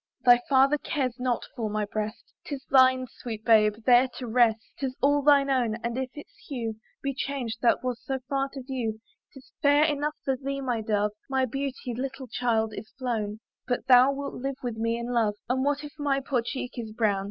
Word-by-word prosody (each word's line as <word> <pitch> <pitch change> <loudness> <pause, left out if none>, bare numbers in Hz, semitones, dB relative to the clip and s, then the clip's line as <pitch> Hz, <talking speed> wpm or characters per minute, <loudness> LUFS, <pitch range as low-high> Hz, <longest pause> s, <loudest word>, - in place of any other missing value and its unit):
Thy 245 -1 +7
father 275 +2 +4
cares 260 -5 -2
not 250 -1 -1
for 225 -3 -2
my 210 0 -1
breast, 215 +2 -5
'Tis 275 -2 -6
thine, 260 -1 +5
sweet 225 -2 -8
baby, 215 -2 +5
there 250 +1 +6
to 255 - -5
rest: 230 -1 +4 0.2
'Tis 265 -2 -2
all 285 +1 +3
thine 280 -1 +5
own! 240 -5 +1
and 235 0 -2
if 260 0 -2
its 295 - -10
hue 235 -5 -3 0.3
Be 275 0 -1
changed, 255 -4 -3
that 240 - +3
was 250 -2 -2
so 270 - -2
fair 275 -1 0
to 270 -2 -7
view, 245 -5 -3 0.3
'Tis 270 -2 -15
fair 290 +1 +5
enough 300 0 0
for 270 - +1
thee, 275 +1 -4
my 245 -4 -1
dove! 210 -1 0 0.2
My 265 -1 +2
beauty, 265 0 -4
little 270 +2 -4
child, 225 -2 0
is 215 - -8
flown; 220 -5 -3 0.3
But 245 0 -1
thou 255 +1 +7
wilt 280 0 -5
live 270 +1 -4
with 240 -2 -3
me 230 +1 0
in 235 +1 -4
love, 220 -3 +2
And 260 +2 0
what 290 +1 0
if 295 - -8
my 280 -2 +1
poor 265 -2 0
cheek 250 +1 -4
be 230 -3 -6
brown? 210 -4 +2
255 Hz, 205 wpm, -27 LUFS, 230-275 Hz, 0.3 s, Thy